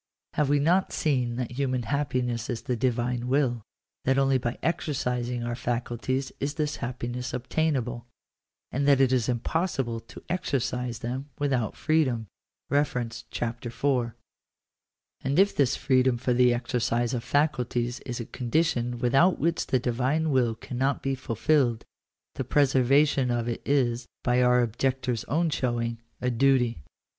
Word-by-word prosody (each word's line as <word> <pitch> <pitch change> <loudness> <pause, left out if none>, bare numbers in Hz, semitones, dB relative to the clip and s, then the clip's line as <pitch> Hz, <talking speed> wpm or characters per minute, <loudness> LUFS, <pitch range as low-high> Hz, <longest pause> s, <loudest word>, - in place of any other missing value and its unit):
Have 150 -2 +1
we 145 - +4
not 175 +6 +2
seen 125 -6 0
that 125 -1 -3
human 130 -1 -1
happiness 125 -4 -1
is 120 -3 -3
the 125 - -1
Divine 120 0 0
will 125 -3 +1 0.2
— - - -47
that 135 +1 +3
only 135 -1 +3
by 120 0 -3
exer 160 -2 -1
cising 125 -1 -2
our 120 - -2
faculties 120 +2 -2
is 145 +2 -2
this 150 -2 -1
happiness 125 +1 -4
obtainable 125 -3 -1 0.3
— - - -62
and 140 +2 0
that 140 -2 +5
it 130 -1 +4
is 125 -2 +1
impossible 125 -1 -1
to 115 - -13
exercise 125 -8 -1
them 130 +4 -4
without 135 -7 0
freedom? 140 -8 +1 1.0
(Chap. 120 0 -3
IV.) 120 +3 -5 1.4
And 135 +3 0
if 195 +2 +4
this 135 -4 +3
freedom 130 -2 +2
for 125 +1 0
the 125 0 +5
exercise 120 0 0
of 120 -2 -2
faculties 125 -5 0
is 125 -2 -5
a 115 - -4
condition 125 -2 0
without 135 +9 +3
which 165 +1 0
the 130 - +2
Divine 130 +6 0
will 120 -4 +2
cannot 130 +4 -2
be 135 - 0
fulfilled, 130 0 +1 0.5
the - - -3
preserva 135 +2 +4
tion 135 -3 0
of 120 -1 0
it 120 - -3
is, 125 -4 +1 0.2
by 125 0 +3
our 125 0 +5
objectors 125 +1 -1
own 160 +4 +1
showing, 115 -3 -1 0.2
a 125 - 0
duty. 125 - +2
125 Hz, 150 wpm, -27 LUFS, 120-140 Hz, 1.4 s, that